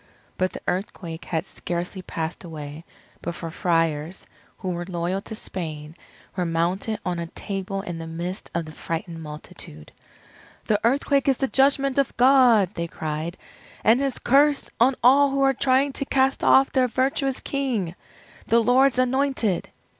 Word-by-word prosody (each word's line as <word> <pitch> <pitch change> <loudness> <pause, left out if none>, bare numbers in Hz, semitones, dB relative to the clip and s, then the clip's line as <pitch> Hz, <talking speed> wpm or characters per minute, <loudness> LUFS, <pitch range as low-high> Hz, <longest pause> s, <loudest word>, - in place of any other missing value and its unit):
But 185 0 0
the - - -7
earthquake 175 -3 -4
had 165 +1 -2
scarcely 180 +1 -4
passed 165 -1 -5
away, 155 -1 -8 0.4
before 170 -1 -5
Friars, 165 -1 0 0.3
who 185 - -3
were 175 0 -3
loyal 180 +1 -2
to 220 - -8
Spain, 155 -6 -6 0.4
were 185 - 0
mounted 175 +6 -1
on 175 -1 -1
a 170 - -4
table 195 +2 -4
in 175 -4 -5
the 165 - -6
midst 170 +3 -5
of 170 -1 -1
the 155 - -9
frightened 165 +1 -5
multitude. 150 - -9 0.7
"The 210 -1 +2
earthquake 275 +3 +2
is 270 -2 +3
the 270 - 0
judgment 275 0 +3
of 275 - 0
God," 245 -7 +5
they 170 -2 -3
cried, 160 +2 -4 0.5
"and 230 +3 +5
his 275 -2 -1
curse 285 +2 +3
on 255 +3 +4
all 275 +3 +6
who 275 0 +1
are 270 0 +4
trying 270 +2 +2
to 275 - 0
cast 270 0 +1
off 270 0 +5
their 255 -2 +3
virtuous 265 +2 0
King, 245 -11 -2 0.5
the 230 - +4
Lord's 250 +3 +4
Anointed!" 255 -6 +1
195 Hz, 155 wpm, -24 LUFS, 170-265 Hz, 0.7 s, all